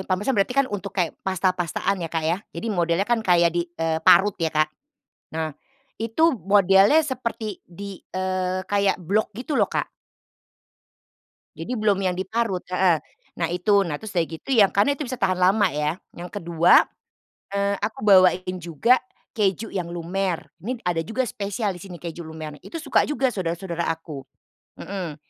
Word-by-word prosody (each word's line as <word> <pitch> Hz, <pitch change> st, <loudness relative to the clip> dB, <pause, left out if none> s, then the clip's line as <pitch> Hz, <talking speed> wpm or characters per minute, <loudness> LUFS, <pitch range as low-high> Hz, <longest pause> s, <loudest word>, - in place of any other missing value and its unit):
parmesan 200 Hz, +8 st, +1 dB
berarti 210 Hz, +4 st, 0 dB
kan 275 Hz, -, +5 dB
untuk 200 Hz, 0 st, -5 dB
kayak 175 Hz, -4 st, +1 dB
pasta 190 Hz, -1 st, +1 dB
pastaan 185 Hz, +2 st, -2 dB
ya, 165 Hz, -, -3 dB
Kak, 160 Hz, -1 st, -2 dB
ya. 170 Hz, +5 st, 0 dB, 0.2 s
Jadi -, -, -4 dB
modelnya 170 Hz, 0 st, +1 dB
kan 240 Hz, +1 st, +1 dB
kayak 175 Hz, -5 st, +3 dB
di 175 Hz, 0 st, -1 dB
eee, 160 Hz, 0 st, 0 dB
parut 190 Hz, +6 st, +6 dB
ya, 165 Hz, -, +2 dB
Kak. 155 Hz, 0 st, +1 dB, 0.7 s
Nah, 160 Hz, -2 st, -2 dB, 0.5 s
itu 260 Hz, +9 st, +3 dB
modelnya 195 Hz, -, +5 dB
seperti 235 Hz, -6 st, -4 dB
di 195 Hz, +2 st, -9 dB
eee, 185 Hz, 0 st, -2 dB
kayak 200 Hz, 0 st, +1 dB
blok 195 Hz, +5 st, 0 dB
gitu 255 Hz, +5 st, -4 dB
loh, -, -, +2 dB
Kak. -, -, -2 dB, 1.7 s
Jadi -, -, -6 dB
belum 210 Hz, -2 st, +2 dB
yang 185 Hz, -1 st, +1 dB
diparut 195 Hz, -1 st, -1 dB
heeh. 180 Hz, -2 st, +3 dB, 0.4 s
Nah 165 Hz, -, +1 dB
itu, 200 Hz, +3 st, +3 dB
nah 150 Hz, -, -2 dB
terus 220 Hz, -, -8 dB
sudah 170 Hz, -2 st, +2 dB
gitu 160 Hz, +10 st, -10 dB
yang 205 Hz, -4 st, +6 dB
karena 205 Hz, +8 st, +3 dB
itu 285 Hz, -1 st, -5 dB
bisa 255 Hz, -, -3 dB
tahan 185 Hz, -1 st, +2 dB
lama 195 Hz, +3 st, +4 dB
ya, 150 Hz, +2 st, -1 dB, 0.2 s
yang 175 Hz, +1 st, -7 dB
kedua 170 Hz, -4 st, +4 dB, 0.7 s
eee, 200 Hz, 0 st, 0 dB
aku 215 Hz, +1 st, -3 dB
bawain 185 Hz, -1 st, +5 dB
juga 175 Hz, -, +2 dB, 0.4 s
keju 210 Hz, -1 st, 0 dB
yang 180 Hz, -3 st, -3 dB
lumer, 175 Hz, +1 st, -2 dB, 0.2 s
ini 250 Hz, +6 st, -3 dB
ada 175 Hz, -2 st, 0 dB
juga 225 Hz, +10 st, -1 dB
spesial 205 Hz, -1 st, -3 dB
di 175 Hz, -, -11 dB
sini 185 Hz, -3 st, -9 dB
keju 170 Hz, 0 st, -7 dB
lumer 155 Hz, -2 st, -8 dB
nih. -, -, -40 dB
Itu -, -, -7 dB
suka 280 Hz, -5 st, +3 dB
juga 275 Hz, -3 st, +1 dB
saudara-saudara 170 Hz, -2 st, -3 dB
aku, 160 Hz, -4 st, -5 dB, 0.6 s
mhm. 185 Hz, -6 st, -5 dB
185 Hz, 170 wpm, -24 LUFS, 170-205 Hz, 1.7 s, parut